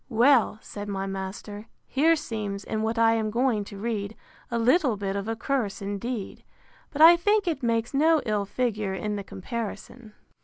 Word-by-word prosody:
Well, 245 -1 +4
said 205 0 -7
my 195 -1 -2
master, 195 +2 -6 0.2
here 320 +5 +3
seems, 215 -9 -4
in 215 +2 -3
what 225 +1 -1
I 225 0 +5
am 220 -1 0
going 235 -1 +1
to 200 - -10
read, 215 -1 -3 0.3
a 235 - -1
little 250 - +3
bit 195 -1 -3
of 200 +1 -3
a 225 - -1
curse 240 -4 -2
indeed, 205 +2 -5 0.5
but 305 +1 +2
I 335 +2 +10
think 415 +4 +2
it 310 -5 -1
makes 230 0 0
no 315 +3 +4
ill 210 -2 0
figure 210 -3 -2
in 210 +3 -3
the 200 - -4
comparison. 215 +2 -7
225 Hz, 180 wpm, -26 LUFS, 205-255 Hz, 0.5 s, I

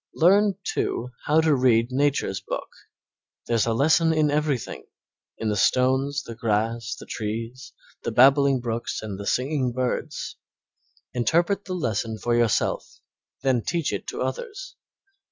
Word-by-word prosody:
Learn, 195 +4 +4
too, 125 +2 -2
how 155 +2 +4
to 160 -1 +3
read 120 -2 +3
Nature's 140 -7 0
book. - - -5 0.8
There's 115 -1 +1
a 115 - +2
lesson 160 +5 +4
in 155 -2 +2
everything 145 -4 -2 0.5
in 110 - -2
the 105 - 0
stones, 130 +6 +2
the 115 - -8
grass, 115 +1 -1
the - - -10
trees, 115 +4 -5 0.3
the - - -3
babbling 135 +2 +5
brooks 115 -2 -3
and 100 -3 -6
the 100 - -6
singing 130 -1 0
birds. 125 0 -3 0.8
Interpret 170 - +1
the 185 - -4
lesson 110 - -2
for 120 +2 -1
yourself, 120 -3 0 0.4
then 130 -3 +2
teach 165 -2 -1
it - - -4
to - - -3
others. - - -5
130 Hz, 140 wpm, -25 LUFS, 115-155 Hz, 0.8 s, babbling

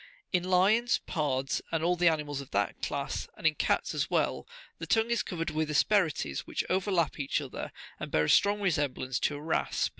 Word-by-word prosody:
In 180 -1 +2
lions, 195 +6 +3
pards, 140 -4 -1
and 165 -1 0
all 175 +1 +3
the 175 0 +3
animals 150 -3 0
of 135 - -11
that 100 0 -1
class, 140 0 -3
and - - -10
in 160 - +5
cats - - 0
as - - -1
well, - - 0 0.3
the - - -6
tongue 225 +1 +2
is 235 - +2
covered 165 -3 -3
with 155 0 -1
asperities,52 155 - +2
which - - -2
overlap 185 -4 +1
each 140 +1 0
other, 140 -4 -6 0.3
and - - -5
bear 75 - +2
a 75 - 0
strong 205 +1 +4
resemblance 145 -8 0
to 150 - 0
a - - -6
rasp. 160 +2 0
160 Hz, 200 wpm, -30 LUFS, 140-185 Hz, 0.3 s, in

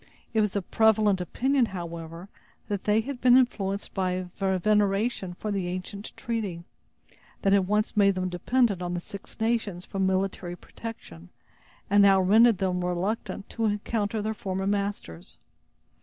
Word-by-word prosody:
It 220 - +3
was 210 -2 0
the 200 - -1
prevalent 215 -2 +3
opinion, 260 - +1
however, 170 -1 -7 0.4
that 200 -2 -3
they 210 +1 +3
had 255 +1 -6
been 250 0 +7
influenced 200 -6 0
by 185 -1 -1
veneration 195 +1 +1
for 210 +3 -4
the 195 -3 -1
ancient 185 +3 -5
treaty, 215 -9 -3 0.8
that 195 - +4
had 195 -2 +3
once 210 +1 0
made 200 -2 +4
them 185 0 -1
dependent 200 +3 +1
on 175 0 -2
the - - -1
Six 195 +2 -10
Nations 220 -5 -1
for 195 - -6
military 190 -2 0
protection, 90 - -10 0.6
and 205 +1 +5
now 195 -1 +6
rendered 220 +4 +5
them 180 -1 -1
reluctant 190 +3 -2
to 230 - -1
encounter 210 0 -1
their 220 +1 -1
former 190 -2 -3
masters. 200 - -3
200 Hz, 150 wpm, -27 LUFS, 185-215 Hz, 0.8 s, been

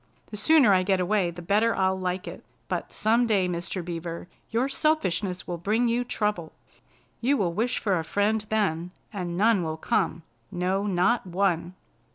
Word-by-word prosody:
The - - -5
sooner 255 -1 +5
I 185 - +4
get 190 0 +1
away 185 0 +1
the 175 +1 -9
better 215 +5 +2
I'll 190 0 +2
like 185 0 -3
it. - - -8 0.2
But - - -3
some 230 +3 +2
day, 200 -5 +2
Mr. 175 0 -4
Beaver, 170 0 -5 0.2
your 235 +4 +1
selfishness 205 - 0
will 175 -1 -4
bring 220 +7 +1
you 235 +1 +1
trouble. 210 -8 -2 0.7
You 275 +4 +2
will 175 -6 0
wish 230 +7 0
for 195 -5 +1
a - - -3
friend 205 +5 0
then, 180 -6 0 0.2
and 175 -3 -4
none 215 0 +4
will 160 -1 -3
come. 160 +1 -1 0.3
No, 185 +3 -1
not 195 +4 +1
one!" 180 -1 0
190 Hz, 175 wpm, -26 LUFS, 175-220 Hz, 0.7 s, sooner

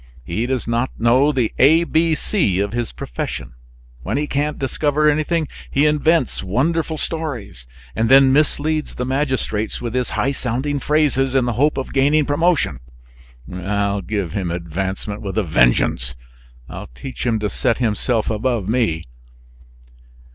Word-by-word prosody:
He 105 - -2
does 130 -3 -2
not 120 +2 0
know 130 +5 +4
the 125 -6 0
A 160 +6 +6
B 165 -1 +2
C 130 - 0
of 100 +1 -1
his 120 -1 -2
profession. - - -5 0.5
When 65 - -2
he 150 - 0
can't 150 +1 -1
discover 145 +2 +1
anything, 155 +1 +1 0.2
he 140 +2 +2
invents 150 -1 +2
wonderful 155 - 0
stories, 130 - -5 0.3
and 115 - +1
then 135 0 +7
misleads 155 +1 0
the 125 - -3
magistrates 130 -5 -1
with 120 -2 -4
his 125 -1 -1
high 135 - +1
sounding 135 +2 -2
phrases, 135 -3 +1
in 130 -2 +3
the 120 - -1
hope 145 +6 +2
of 135 - -4
gaining 145 +2 +3
promotion. 165 +3 +1 0.8
I'll 100 +2 -1
give 100 -2 -3
him 95 -3 -2
advancement 95 +4 -4
with 100 0 -5
a 110 - +2
vengeance! 60 -4 +2 0.5
I'll - - -8
teach 135 - -7
him 115 -2 +2
to 105 -1 -1
set 115 - 0
himself 115 -1 0
above 110 -2 -1
me!" 110 -9 0
125 Hz, 150 wpm, -20 LUFS, 105-150 Hz, 0.8 s, then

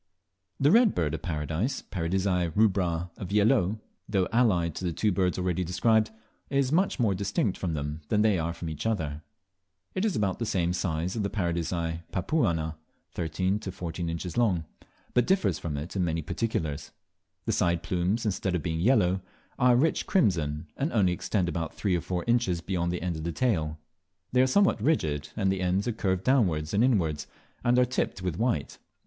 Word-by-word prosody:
The 140 +2 +4
Red 230 0 +5
Bird 75 -3 0
of 80 - -3
Paradise 80 - -2
(Paradisea 90 0 0
rubra 90 -5 +2
of 95 - -5
Viellot), 105 0 +3 0.3
though 95 -3 +2
allied 95 -9 +3
to 95 - -6
the 90 - 0
two 105 +6 +1
birds 90 -2 +1
already 90 0 0
described, 110 +5 +2 0.4
is 140 -1 +1
much 180 0 +2
more 110 -5 +3
distinct 100 +1 0
from 85 -4 -2
them 75 +1 -4
than 105 +5 +2
they 105 -5 +3
are 85 +1 -1
from 85 0 -6
each 80 +6 -3
other. 80 -9 -2 0.7
It 185 - -1
is 215 -5 +1
about 100 -3 0
the 115 - -1
same 90 -3 +1
size 85 -1 -1
as 110 - -1
Paradisea 85 -4 -1
papuana 85 - 0 0.3
(13 90 +4 -1
to 95 - -5
14 85 -1 -4
inches 85 +4 -4
long), 95 -9 +2 0.5
but 125 -1 +3
differs 190 0 +2
from 75 -4 -4
it 75 +7 -6
in 95 - +1
many 80 -2 -1
particulars. 80 -7 -2 0.6
The - - +1
side 85 -1 +1
plumes, 95 +6 0
instead 95 -2 0
of 85 - -2
being 80 -1 -2
yellow, 95 -3 +3 0.4
are 125 0 +5
rich 155 +7 +1
crimson, 80 - +1
and 145 +4 -1
only 95 -6 +3
extend 90 +1 -1
about 85 -2 -3
three 95 -4 0
or 85 - 0
four 90 +1 -3
inches 115 -7 +2
beyond 85 -1 -1
the 90 -1 -3
end 90 -3 -2
of 80 - -6
the 85 - -2
tail; 80 -10 0 0.5
they 125 - +4
are 130 - +4
somewhat 195 - +3
rigid, 75 - 0
and 95 -2 +2
the 95 -1 -1
ends 95 +3 +1
are - - +2
curved 95 -4 -1
downwards 90 - +2
and 105 +3 +3
inwards, 85 - +1 0.4
and 120 +1 +3
are 125 - +5
tipped 125 -6 -2
with 90 -3 -2
white. 110 - -1
90 Hz, 190 wpm, -28 LUFS, 85-110 Hz, 0.7 s, Red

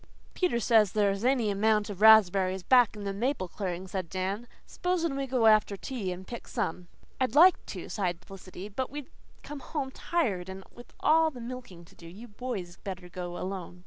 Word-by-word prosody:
"Peter 355 -11 +1
says 220 -3 +4
there's 200 -1 +1
any 245 -4 +2
amount 210 +1 +2
of 205 -2 -7
raspberries 190 -4 +6
back 245 0 +4
in 210 - -7
the 200 0 -3
maple 230 -1 -1
clearing," 185 0 -5
said 185 -2 -4
Dan. 190 +6 -3 0.2
"S'posen 340 -5 -1
we 275 0 -2
all - - -13
go 250 -3 +2
after 215 -2 +4
tea 205 -3 -4
and 180 +1 -7
pick 235 - -8
some?" 175 +2 -3 0.3
"I'd 260 -1 0
like 350 +5 +7
to," - - -7
sighed 180 -3 -3
Felicity, 190 0 -10
"but 250 +5 -4
we'd 290 -1 -8 0.3
come 295 -1 -7
home 275 -2 -4
tired 210 - -1
and 190 0 -8
with 240 - -14
all 320 +1 +4
the 260 -5 -11
milking 235 -8 -8
to - - -20
do. 170 - -14
You 205 +8 -11
boys 205 -6 -6
better 185 -2 -7
go 175 0 -6
alone." 185 -2 -6
205 Hz, 195 wpm, -29 LUFS, 185-255 Hz, 0.3 s, like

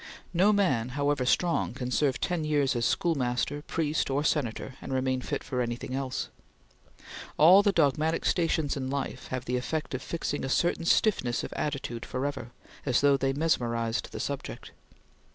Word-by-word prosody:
No 190 +4 +4
man, 155 - +2
however 140 -3 +1
strong, 170 -5 +1
can 125 -2 -4
serve 135 0 +1
ten 175 -3 -1
years 145 -4 +1
as 120 -1 +1
schoolmaster, 145 -3 0
priest, 155 -1 -1
or 140 +2 0
Senator, 130 -4 -1
and - - -7
remain 130 0 0
fit - - -3
for 125 -2 -2
anything 120 +1 -3
else. 135 -1 -3 1.1
All 180 +6 +8
the 205 -1 +3
dogmatic 155 0 +1
stations 165 -4 +1
in 130 -2 -3
life 135 -1 -4
have 130 -1 -4
the 125 +1 0
effect 150 +5 -3
of 130 - -3
fixing 145 0 -3
a 135 - -2
certain 170 +3 +1
stiffness 150 - +2
of - - -6
attitude 135 -6 -3
forever, 130 -2 -3 0.3
as 125 - +2
though 140 0 +5
they 135 0 +1
mesmerized 120 -6 0
the - - -6
subject. - - -5
140 Hz, 165 wpm, -28 LUFS, 125-160 Hz, 1.1 s, All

